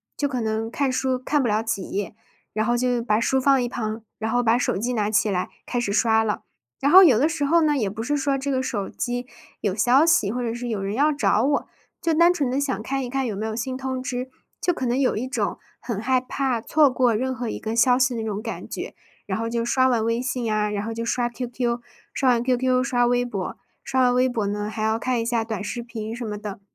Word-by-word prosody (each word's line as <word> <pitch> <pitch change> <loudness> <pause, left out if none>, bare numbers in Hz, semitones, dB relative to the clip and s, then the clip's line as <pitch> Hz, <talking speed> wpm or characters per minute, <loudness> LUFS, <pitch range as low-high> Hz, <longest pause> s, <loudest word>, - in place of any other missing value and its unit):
就 285 -1 -1
可 255 -3 -2
能 220 0 -2
看 280 0 0
书 255 0 0
看 290 +3 +1
不 250 - 0
了 210 +1 +2
几 220 -4 -2
页， 205 +1 -3 0.4
然 220 0 0
后 240 0 +2
就 245 -1 +1
把 215 -2 +2
书 265 +3 +2
放 270 0 +4
一 245 - 0
旁， 220 -2 -4 0.2
然 220 0 -2
后 245 - +2
把 230 0 +3
手 245 - 0
机 240 +5 -1
拿 210 -3 0
起 215 0 +2
来 185 -2 -1 0.2
开 245 - -3
始 240 -4 0
刷 220 +1 +3
了。 210 -1 -2 0.4
然 280 - +2
后 375 +5 +10
有 260 -10 +6
的 290 - +4
时 315 -2 -2
候 335 +4 +4
呢， 300 -2 +3
也 220 -8 0
不 215 +3 -6
是 290 +5 0
说 275 -1 0
这 275 +1 -3
个 260 -1 0
手 210 -6 -2
机 245 +1 -3 0.3
有 195 -3 -1
消 250 +7 +4
息， 275 -12 +3
或 250 - -2
者 230 -2 -2
是 240 0 -5
有 210 -4 -2
人 195 +1 -2
要 295 +3 +3
找 220 -6 +2
我， 285 +2 +1 0.3
就 335 -2 +1
单 340 +2 +5
纯 290 -7 -1
地 265 +3 0
想 260 -6 -1
看 270 +3 -2
一 245 - -5
看 270 +1 -1
有 220 -4 -3
没 215 +3 -3
有 220 - -3
新 245 +3 -3
通 260 -1 -3
知， 255 0 -4 0.3
就 355 - +2
可 260 - -3
能 245 +1 +1
有 265 -5 +1
一 250 - -2
种 270 - -2 0.2
很 230 -5 -3
害 255 +3 +2
怕 255 -2 -1
错 300 +4 +4
过 250 -2 +2
任 260 +4 -1
何 240 -1 -4
一 - - -4
个 220 +1 -3
消 245 +2 +4
息 255 -1 +2
的 225 - -3
那 - - -4
种 210 -1 -3
感 230 0 -6
觉。 - - -6 0.3
然 190 0 -2
后 230 0 -2
就 235 0 -1
刷 260 +2 +3
完 230 -3 +1
微 230 +1 0
信 250 -3 -2
啊， 210 0 +1
然 205 0 -3
后 225 - -3
就 230 +1 -4
刷 240 +1 0
QQ， 240 0 -3 0.3
刷 265 -2 +2
完 235 -1 +3
QQ， 255 0 +2
刷 245 -2 +2
微 245 0 +2
博， 200 -6 -4 0.3
刷 260 0 0
完 250 0 +4
微 255 +1 +3
博 220 -4 -1
呢， 205 +1 -2
还 215 0 -5
要 220 +1 +1
看 245 0 -1
一 - - -3
下 230 -1 0
短 220 -3 -4
视 235 +3 -4
频 225 -1 -6
什 240 - -6
么 210 -2 -4
的。 205 -1 -7
245 Hz, 290 characters per minute, -24 LUFS, 220-260 Hz, 0.4 s, 后